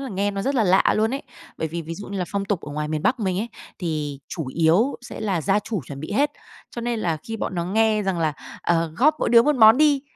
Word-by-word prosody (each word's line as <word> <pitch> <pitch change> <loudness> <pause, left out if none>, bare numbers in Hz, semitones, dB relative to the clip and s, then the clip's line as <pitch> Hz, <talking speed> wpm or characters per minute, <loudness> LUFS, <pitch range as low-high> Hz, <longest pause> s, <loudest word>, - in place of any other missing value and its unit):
là 270 - -5
nghe 200 0 -1
nó 195 0 -3
rất 275 +3 0
là 230 - +3
lạ 190 0 +4
luôn 220 +4 +1
ấy. 275 - -4 0.4
Bởi 160 - -2
vì 170 +2 -4
ví 165 +1 -6
dụ 205 +3 -9
như 200 -1 -4
là 180 - 0
phong 200 -1 -2
tục 200 -3 -1
ở 145 - -8
ngoài 150 0 -3
miền 155 -1 -2
Bắc 250 -1 +1
mình 190 -3 0
ấy, 235 - -3 0.3
thì 150 -5 -3
chủ 160 -6 -5
yếu 170 - +2
sẽ - - -9
là 195 -6 0
gia 200 +1 +2
chủ 210 -4 -3
chuẩn 140 -1 -8
bị 155 - -6
hết. 290 +6 +2 0.4
Cho 235 - -6
nên 235 -1 -1
là 165 -5 0
khi 225 - -3
bọn 195 - -4
nó 170 - -1
nghe 215 +3 +2
rằng 190 -3 -1
là, 155 -2 +1 0.3
"Ờ, 165 -2 +1
góp 300 +5 +4
mỗi - - +1
đứa 235 -1 +7
một 295 0 +2
món 220 0 +8
đi" 290 -3 +4
195 Hz, 285 wpm, -23 LUFS, 165-225 Hz, 0.4 s, món